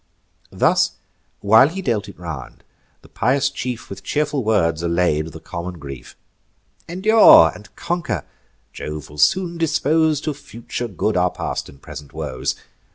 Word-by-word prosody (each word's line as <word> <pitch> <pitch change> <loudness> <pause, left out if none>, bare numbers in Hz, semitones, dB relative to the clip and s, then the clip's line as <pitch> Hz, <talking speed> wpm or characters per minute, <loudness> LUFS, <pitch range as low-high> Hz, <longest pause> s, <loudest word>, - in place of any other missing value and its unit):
Thus - - +2 0.5
while 110 +6 +6
he 190 +3 -6
dealt 105 - -1
it - - -13
round, 75 -9 -8 0.4
the - - -16
pious 135 +4 +1
chief 125 -2 -5
With 95 -1 -9
cheerful 150 -2 -1
words 85 -7 +1
allay'd 85 -2 +1
the 80 0 -10
common 85 +2 -6
grief: 70 -4 -10 0.7
"Endure, 190 - +7
and 105 - -13
conquer! 150 - -3 0.5
Jove 75 -1 -7
will 75 - -11
soon 175 - +2
dispose 160 -1 +2
To 155 - -2
future 120 -3 -6
good 105 +1 -2
our 90 0 +3
past - - -4
and 70 - -16
present 70 0 -10
woes. 65 - -3
105 Hz, 145 wpm, -20 LUFS, -, 0.7 s, Endure